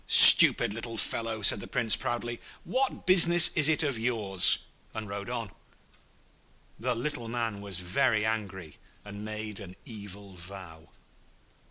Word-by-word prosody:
'Stupid - - +9
little 115 0 -11
fellow,' 115 -1 -7
said - - 0
the - - -13
Prince, 115 -3 -2
proudly; 120 0 -9 0.2
'what 260 +1 -7
business 175 -2 +4
is 155 -2 +1
it 160 0 -1
of 140 -6 -6
yours?' 110 -6 -2 0.3
and 110 -1 -10
rode 100 +2 -11
on. 115 -5 -9 1.3
The 125 +2 -6
little 120 -1 -9
man 115 -3 -8
was 100 -3 -8
very 105 +5 -4
angry, 95 -8 -9 0.3
and 100 0 -13
made 110 -1 -11
an 95 -3 -15
evil 100 -3 -15
vow. 90 -3 -16
110 Hz, 140 wpm, -24 LUFS, 100-120 Hz, 1.3 s, Stupid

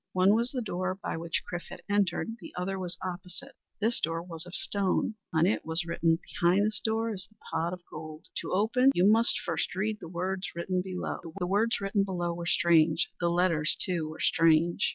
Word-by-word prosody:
One 185 +2 +5
was 235 +3 +2
the 255 -3 -3
door 185 -2 -2
by - - -2
which 165 0 -2
Chrif 175 0 -5
had - - -10
entered. 205 +2 0
The 175 - -10
other 190 +2 -2
was 180 -1 -4
opposite. 180 +9 -6 0.3
This 225 +3 +2
door 165 +1 -1
was 170 -1 -7
of 180 - -6
stone. 200 +2 +2 0.2
On 160 0 +3
it 200 - +1
was 165 +2 +1
written: 165 -1 +1
"Behind 180 +4 +2
this 215 0 +1
door 225 0 0
is 185 -3 -6
the 215 - -28
Pot 165 +1 0
of 180 0 -6
Gold. 155 0 -9
To - - -4
open 230 +7 +3
you 180 - +4
must 225 +2 +4
first 165 0 -2
read 210 +3 -1
the 165 - -9
words 185 +2 -3
written 180 +2 -1
below." 185 -1 -4 0.2
The 180 - -1
words 210 +5 +1
written 195 0 +1
below 175 -3 -2
were 170 0 -5
strange; 165 -2 +3
the 170 - +1
letters 170 -3 +3
too 170 -5 -1
were 155 - -9
strange. 165 +1 +3
180 Hz, 205 wpm, -29 LUFS, 170-205 Hz, 0.3 s, One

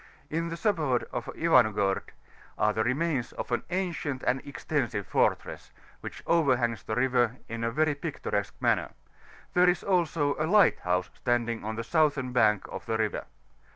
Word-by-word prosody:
In 165 +2 -1
the 165 - -5
suburb 160 - 0
of 120 - -4
Ivan^orod 110 -11 +3 0.6
are 105 0 +2
the 110 +1 0
remains 130 0 -1
of - - -6
an 120 - +1
ancient 170 -7 -2
and 130 +2 +1
extensive 120 -7 -2
fortress, - - 0 0.3
which - - -8
overhangs 130 - +2
the 110 - -4
river 125 -1 +2
m 115 0 -5
a 115 - +1
very 155 +4 +1
picturesque 145 - -3
manner; - - +1 0.6
there 180 0 +5
is 175 -2 0
also 165 -6 +1
a 155 - +1
lighthouse 95 - +3
standing 120 -2 -1
on 110 +1 -3
the 115 - -3
southern 145 -2 +1
bank 105 -5 +3
of - - -7
the 110 -1 0
river. 110 -1 -1
130 Hz, 155 wpm, -28 LUFS, 115-160 Hz, 0.6 s, there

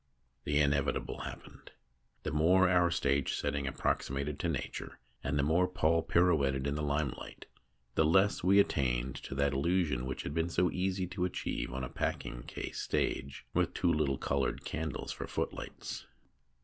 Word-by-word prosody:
The 75 0 +1
inevitable 70 -1 +1
happened. - - -9 0.5
The - - -2
more 90 +5 +5
our 90 -1 +4
stage 70 -4 +1
setting 70 -1 -1
approximated 70 +1 -1
to 85 - 0
Nature, 75 - -4 0.3
and 70 +2 0
the 70 - +2
more 85 +5 +3
Paul 85 -2 +2
pirouetted 70 -8 +2
in 70 - 0
the 75 - -2
limelight, 75 -2 -2 0.5
the - - +3
less 95 +6 +3
we 95 +3 +6
attained 65 -8 +1
to - - -7
that 70 0 +2
illusion 75 -3 +1
which 65 - -4
had 70 - -4
been 80 +2 0
so 90 +1 +2
easy 95 0 0
to 90 -1 -1
achieve 90 - -3
on 65 +1 -4
a - - -2
packing - - -3
case - - -5
stage 70 +1 -1
with - - +1
two 85 - +2
little 70 -3 +1
coloured - - -1
candles 80 -2 -3
for - - -5
footlights. - - -4
75 Hz, 160 wpm, -32 LUFS, 70-90 Hz, 0.5 s, we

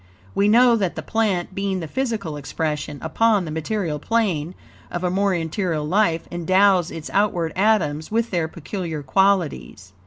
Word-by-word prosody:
We 200 - +2
know 240 +2 +6
that 190 -5 -1
the - - -5
plant, 205 -6 -1
being 195 -1 -2
the 165 - -5
physical 220 - -2
expression 150 0 -3
upon 205 +4 +2
the 155 - -5
material 160 -1 -2
plane 185 -5 -1 0.3
of 175 - -4
a 180 - +1
more 195 0 +1
interior 165 0 -2
life, 170 +1 +1
endows 185 +1 +3
its 160 -1 -7
outward 180 -5 +1
atoms 180 -7 +1
with 230 +2 0
their 170 -4 0
peculiar 165 -1 -5
qualities. 155 - 0
180 Hz, 155 wpm, -22 LUFS, 160-205 Hz, 0.3 s, know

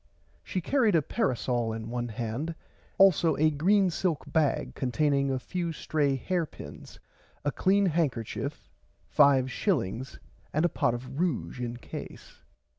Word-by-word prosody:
She 185 - -3
carried 230 -2 +2
a 160 - +3
parasole 125 - 0
in 110 0 -6
one 120 0 -2
hand 120 +8 -4 0.4
also 175 -5 +5
a 155 +1 +4
green 185 +6 +3
silk 165 -3 -1
bag 155 -4 0
containing 140 +1 +1
a 135 - 0
few 170 +5 -3
stray 150 -3 0
hair 170 +5 -1
pins - - -11 0.5
a 145 - +2
clean 195 +5 +3
handkerchief 150 - -2 0.3
five 135 -3 +4
shillings 130 - -1 0.3
and 155 +3 +2
a - - +3
pot 120 - +1
of 130 +4 -7
ruge 125 - -1
in 120 -1 -4
case. - - -9
145 Hz, 140 wpm, -28 LUFS, 125-175 Hz, 0.5 s, also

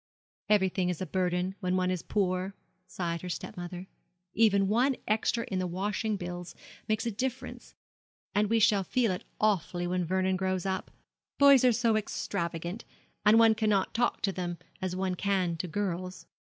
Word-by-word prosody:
'Everything 190 -3 +2
is 180 - -2
a 185 - -2
burden 180 0 -1
when 185 -2 0
one 185 0 +1
is 180 -2 -2
poor,' 190 -1 -1 0.3
sighed 170 -3 -3
her 180 - -6
stepmother; 180 0 -6 0.5
'even 200 -3 +4
one 250 +6 +2
extra 220 +2 +1
in 190 - -1
the 185 - -1
washing 205 +4 -1
bills 175 -1 -6 0.3
makes 215 +1 0
a 230 - 0
difference; 250 +2 -5 0.6
and 205 0 +2
we 230 - +3
shall 210 -3 +4
feel 230 +2 +1
it 180 - -4 0.2
awfully 185 -4 +1
when 180 0 0
Vernon 185 +2 +1
grows 185 -1 -1
up. 190 0 -2 0.5
Boys 280 -2 +7
are 250 - +6
so 230 -1 +2
extravagant; 175 -3 -3 0.4
and 215 +2 +7
one 225 -1 +7
cannot 210 -3 +1
talk 240 +1 0
to 195 - +2
them 175 -2 -4 0.2
as 185 -1 -2
one 185 0 -1
can 185 -2 0
to 180 +2 -3
girls.' 185 0 -3
190 Hz, 165 wpm, -29 LUFS, 180-215 Hz, 0.6 s, Boys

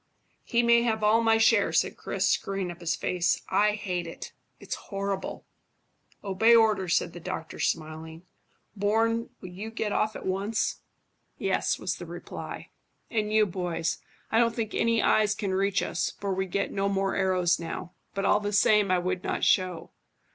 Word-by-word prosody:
"He 240 -1 +1
may 235 0 +5
have 220 -2 0
all 215 +2 +4
my 225 -1 +4
share," 225 -2 +4
said - - +1
Chris, - - -1
screwing 195 -2 -1
up 175 - -11
his 170 -1 -1
face. 180 -1 0
"I 210 0 +3
hate 180 -5 -3
it. 165 - -8 0.3
It's - - -5 0.2
horrible." 195 -1 -3 0.8
"Obey 215 +4 +4
orders," 210 -6 +3
said - - -2
the 175 - -8
doctor, 160 -1 -6
smiling. 160 +1 -3 0.5
"Bourne, 225 +3 +1
will 185 - -8
you 195 +5 -7
get 220 -2 -3
off 215 +1 0
at - - -7
once?" 200 +4 -1 0.6
"Yes," - - 0
was - - -3
the - - -8
reply. - - -8 0.4
"And 215 -2 0
you, 215 0 +4
boys. 175 -3 -2 0.3
I 225 - +4
don't 230 -1 +2
think 225 -2 -3
any 230 -1 +2
eyes 215 -1 +3
can 195 -3 -2
reach 195 0 +1
us, - - -2
for 200 -1 -2
we 190 0 -1
get 200 +2 -1
no 195 0 0
more 195 0 0
arrows 185 -2 +2
now; 170 0 -6 0.2
but 195 0 -1
all 210 - +4
the 205 0 -3
same, 205 0 +4
I 185 - +3
would 185 +1 -2
not - - -2
show. 185 -3 +1
200 Hz, 175 wpm, -27 LUFS, 180-220 Hz, 0.8 s, may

